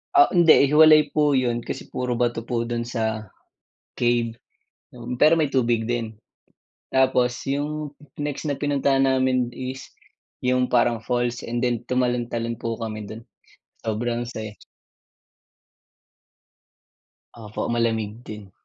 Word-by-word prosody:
Ah, 360 0 +7
hindi, 165 -5 +6
hiwalay 155 -1 +6
po 150 -2 +2
yun 120 -2 +1
kasi - - -7
puro 125 -1 -2
bato 120 -1 0
po 120 -2 -1
dun 120 0 -3
sa 110 -3 -2 0.7
cave, 120 -1 +1 0.6
yun, 120 0 -6
pero 155 +2 +6
may 155 -4 0
tubig 120 -3 +1
din. 115 -2 -3 0.8
Tapos 130 -2 +2
yung 145 +1 -3 0.2
next 145 -1 -3
na 145 -3 -2
pinuntahan 140 -2 +2
namin 130 -1 +2
is 130 0 -6 0.6
yung 125 0 +2
parang 120 -2 +2
falls 120 +1 -1
and 120 +1 -2
then 120 -2 +1
tumalon-talon 120 -2 -1
po 115 0 -3
kami 110 -2 -6
dun. 110 +2 -9 0.6
Sobrang 120 +2 -2
saya. 110 -2 -6 2.8
Opo, 110 -2 -5
malamig 115 -1 -1
din. 105 -4 -10
120 Hz, 120 wpm, -23 LUFS, 115-135 Hz, 2.8 s, Ah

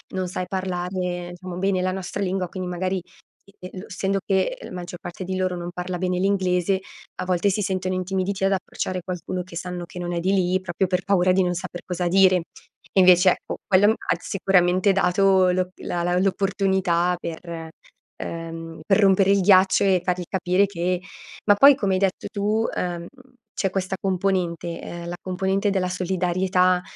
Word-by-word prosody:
non 185 -1 -1
sai 180 0 -4
parlare 180 -1 -3
diciamo 180 -1 -8
bene 190 -1 +1
la 185 0 0
nostra 190 +1 -5
lingua, 185 -2 -1
quindi 185 -2 -5
magari, 185 +1 -1 0.5
e 200 - -21
e 180 - -8
lo 200 - -8
essendo 195 0 -1
che 200 - +1
la - - -9
maggior 175 -1 -7
parte 175 +2 -7
di 185 +1 -3
loro 185 -1 0
non 175 0 -5
parla 180 0 -4
bene 180 0 -1
l'inglese, 190 -1 +1 0.4
a - - -3
volte 185 +2 +1
si 210 +2 0
sentono 185 -1 -1
intimiditi 190 +1 -2
ad 195 - +2
approcciare 185 -1 -3
qualcuno 180 0 -4
che 170 -2 -13
sanno 180 -1 -5
che 180 - -10
non 175 0 -3
è 170 - -1
di 190 +2 +1
lì, 185 -1 +2
proprio 185 +1 -1
per 180 0 -1
paura 185 -2 +3
di 190 0 +3
non 180 0 0
saper 175 +1 -6
cosa 180 -1 -2
dire. 190 0 +5 0.6
E 195 - +4
invece, 180 0 +7
ecco, - - -4
quello 205 +3 +5
ha - - -1
sicuramente 185 0 +2
dato 190 0 +3
lo 185 0 0
la 175 -1 -3
la 175 +1 +1
l'opportunità 190 -2 +1
per, 165 -1 -6 0.5
ehm, 165 0 -7
per 195 - +4
rompere 195 -1 +4
il 200 - +4
ghiaccio 190 +1 +5
e 185 -3 +3
fargli 180 -1 -1
capire 185 +1 +2
che 180 -1 -2 0.4
ma 205 -1 +6
poi 275 +5 +8
come 200 -7 0
hai 185 - +1
detto 195 -1 -1
tu, 215 +2 0
ehm, 175 -1 -3 0.5
c'è 195 - +1
questa 190 0 -2
componente, 180 -3 -1
ehm, 170 0 -7
la 175 - -4
componente 190 +2 0
della 185 -2 0
solidarietà, 180 0 +1
185 Hz, 185 wpm, -23 LUFS, 180-195 Hz, 0.6 s, poi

